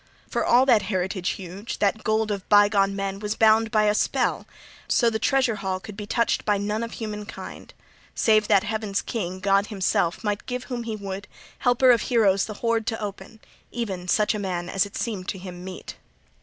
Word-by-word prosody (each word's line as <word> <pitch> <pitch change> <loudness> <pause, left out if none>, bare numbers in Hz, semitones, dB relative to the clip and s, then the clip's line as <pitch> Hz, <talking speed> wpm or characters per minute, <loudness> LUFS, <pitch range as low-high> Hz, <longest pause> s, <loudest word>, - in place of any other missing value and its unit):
For - - -1
all 245 +2 +5
that 240 -5 +5
heritage 185 -1 -2
huge, 195 +4 -7
that 210 +2 0
gold 220 0 +1
of 200 -2 -5
bygone 205 -1 +4
men, 195 0 -3
was 210 +1 -3
bound 220 0 +4
by 215 -1 +2
a 210 0 +3
spell, - - 0 0.4
{39e} - - -4
so 235 - +4
the 220 - -2
treasure 260 -5 +2
hall 190 -2 -2
could 200 +2 -10
be 205 0 -7
touched 235 +1 +1
by 210 -1 +2
none 210 +2 -2
of 230 0 -5
human 210 -2 -5
kind, - - -9 0.4
save 215 -2 +3
that 195 - +4
Heaven's 215 -2 -2
King, 185 -5 -4
God 200 +1 +2
himself, 185 -4 0
might 205 -1 -2
give 250 0 -3
whom 240 -3 -5
he 225 -2 -3
would, 200 -1 -6 0.3
Helper 250 +1 +4
of 235 -3 +3
Heroes, 200 -6 +3
the 215 - -7
hoard 230 0 -1
to 225 -2 -1
open, 210 +1 -7 0.3
even 195 -7 -4
such 210 +5 +2
a 210 - -3
man 180 -3 -3
as 195 +1 0
seemed 205 -6 -3
to 195 - -3
him 180 -1 -9
meet. 185 -1 -8
210 Hz, 200 wpm, -24 LUFS, 195-225 Hz, 0.4 s, all